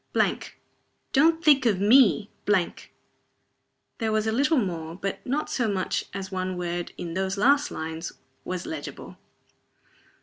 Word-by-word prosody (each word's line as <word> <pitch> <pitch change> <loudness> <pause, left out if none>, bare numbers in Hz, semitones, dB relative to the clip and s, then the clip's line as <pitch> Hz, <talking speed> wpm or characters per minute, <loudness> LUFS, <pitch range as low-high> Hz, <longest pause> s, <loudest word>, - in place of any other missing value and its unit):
don't 325 +4 +3
think 275 -5 +6
of 200 -5 +2
me 215 0 +5
" - - -41 1.5
There 225 -1 0
was 215 0 +1
a 220 - +1
little 285 +7 +2
more, 170 -7 -2
but 195 +1 -4
not 290 +4 -1
so 240 -3 0
much 195 -3 -1
as 190 0 -6
one 185 -1 -3
word, 175 0 -3
in 170 -1 -5
those 190 +2 -1
last 280 +7 +4
lines, 160 +1 -5 0.3
was 185 -1 -4
legible. 320 - -7
200 Hz, 135 wpm, -26 LUFS, 185-265 Hz, 1.5 s, think